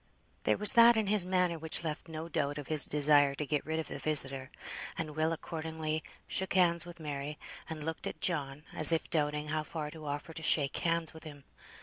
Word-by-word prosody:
There -, -, +2 dB
was 210 Hz, -, +7 dB
that 235 Hz, 0 st, +7 dB
in 220 Hz, -, +1 dB
his 200 Hz, -2 st, +2 dB
manner 180 Hz, -3 st, 0 dB
which 160 Hz, +1 st, -1 dB
left 155 Hz, 0 st, -5 dB
no 160 Hz, 0 st, -7 dB
doubt 145 Hz, -2 st, -2 dB
of 145 Hz, -3 st, -8 dB
his 155 Hz, -2 st, +5 dB
desire 145 Hz, -1 st, +4 dB
to 150 Hz, -, -4 dB
get 150 Hz, 0 st, -1 dB
rid 160 Hz, 0 st, -2 dB
of 160 Hz, -, -3 dB
the -, -, -7 dB
visitor, 135 Hz, -3 st, +1 dB, 0.5 s
and 155 Hz, -2 st, -5 dB
Will 155 Hz, +1 st, 0 dB
accordingly 160 Hz, -1 st, -4 dB, 0.2 s
shook 190 Hz, 0 st, -1 dB
hands 170 Hz, -2 st, +2 dB
with 175 Hz, 0 st, -11 dB
Mary, 145 Hz, -1 st, -5 dB, 0.3 s
and 155 Hz, -2 st, -6 dB
looked 160 Hz, 0 st, -4 dB
at -, -, -7 dB
John, 145 Hz, -4 st, -2 dB
as 155 Hz, +1 st, +6 dB
if 165 Hz, -, -1 dB
doubting 150 Hz, -1 st, -1 dB
how 155 Hz, 0 st, -1 dB
far 155 Hz, -1 st, -6 dB
to 155 Hz, -1 st, -10 dB
offer 145 Hz, +3 st, -5 dB
to 160 Hz, -, -7 dB
shake 145 Hz, -3 st, +4 dB
hands 165 Hz, -1 st, 0 dB
with 160 Hz, -, -12 dB
him. 145 Hz, -3 st, -11 dB
155 Hz, 215 wpm, -31 LUFS, 150-165 Hz, 0.5 s, was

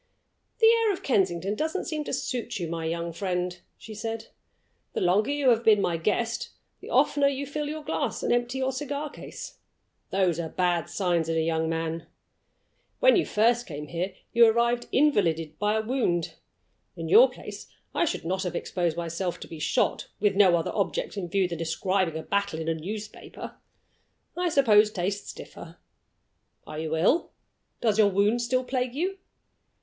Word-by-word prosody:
"The 450 Hz, -, +4 dB
air 455 Hz, -1 st, +5 dB
of 375 Hz, -, -5 dB
Kensington 195 Hz, -5 st, +1 dB
doesn't 315 Hz, -, -2 dB
seem 310 Hz, -3 st, -3 dB
to -, -, -4 dB
suit 245 Hz, -4 st, -3 dB
you, 175 Hz, -3 st, -3 dB
my 165 Hz, 0 st, -4 dB
young 170 Hz, +1 st, -2 dB
friend," 180 Hz, -1 st, -2 dB, 0.2 s
she 220 Hz, -, -10 dB
said. 225 Hz, +1 st, -5 dB, 0.6 s
"The -, -, -1 dB
longer 190 Hz, +6 st, +3 dB
you 285 Hz, -2 st, +2 dB
have 230 Hz, 0 st, +2 dB
been 215 Hz, -2 st, +6 dB
my 175 Hz, -4 st, 0 dB
guest, 225 Hz, +7 st, -1 dB, 0.3 s
the -, -, -11 dB
oftener 285 Hz, -1 st, +3 dB
you 280 Hz, 0 st, -1 dB
fill 290 Hz, +1 st, -3 dB
your 310 Hz, 0 st, -5 dB
glass -, -, -2 dB
and -, -, +2 dB
empty 245 Hz, +2 st, 0 dB
your 265 Hz, 0 st, 0 dB
cigar 285 Hz, +2 st, -4 dB
case. -, -, -9 dB, 0.5 s
Those 185 Hz, -4 st, +1 dB
are 165 Hz, -1 st, -3 dB
bad 175 Hz, -1 st, 0 dB
signs 175 Hz, -4 st, 0 dB
in 165 Hz, -, 0 dB
a -, -, +3 dB
young 160 Hz, 0 st, 0 dB
man. 165 Hz, 0 st, -3 dB, 0.9 s
When -, -, +6 dB
you 365 Hz, -, +2 dB
first 235 Hz, +3 st, +2 dB
came 150 Hz, -3 st, -7 dB
here 180 Hz, +3 st, -3 dB, 0.2 s
you 235 Hz, -1 st, +7 dB
arrived 235 Hz, +2 st, +2 dB
invalided 165 Hz, -, +2 dB
by 210 Hz, +1 st, +1 dB
a 220 Hz, -, 0 dB
wound. 215 Hz, -9 st, 0 dB, 0.6 s
In -, -, -5 dB
your 475 Hz, +4 st, +7 dB
place, -, -, -9 dB, 0.3 s
I -, -, +2 dB
should 300 Hz, -, -3 dB
not 185 Hz, +2 st, -1 dB
have 180 Hz, -2 st, -3 dB
exposed 170 Hz, -3 st, -1 dB
myself 170 Hz, +1 st, -3 dB
to -, -, -7 dB
be 165 Hz, -, -9 dB
shot, -, -, 0 dB
with 205 Hz, -1 st, +2 dB
no 190 Hz, -3 st, +6 dB
other 165 Hz, -, -2 dB
object -, -, -1 dB
in 185 Hz, -4 st, -4 dB
view 195 Hz, -1 st, +2 dB
than 170 Hz, -2 st, -5 dB
describing 170 Hz, +1 st, 0 dB
a 160 Hz, -, -5 dB
battle 200 Hz, -5 st, -1 dB
in 160 Hz, -, -4 dB
a 165 Hz, -, +2 dB
newspaper. 205 Hz, +7 st, -7 dB, 0.8 s
I 355 Hz, 0 st, 0 dB
suppose 220 Hz, -8 st, +5 dB
tastes 200 Hz, 0 st, -3 dB
differ. -, -, -11 dB, 0.9 s
Are 155 Hz, 0 st, -7 dB
you 160 Hz, 0 st, -2 dB
ill? 205 Hz, -, +2 dB, 0.5 s
Does 220 Hz, -2 st, +2 dB
your 210 Hz, -2 st, +6 dB
wound 205 Hz, +5 st, +2 dB
still 255 Hz, +2 st, +1 dB
plague 255 Hz, -1 st, -2 dB
you?" 375 Hz, +6 st, -2 dB
205 Hz, 180 wpm, -27 LUFS, 170-255 Hz, 0.9 s, you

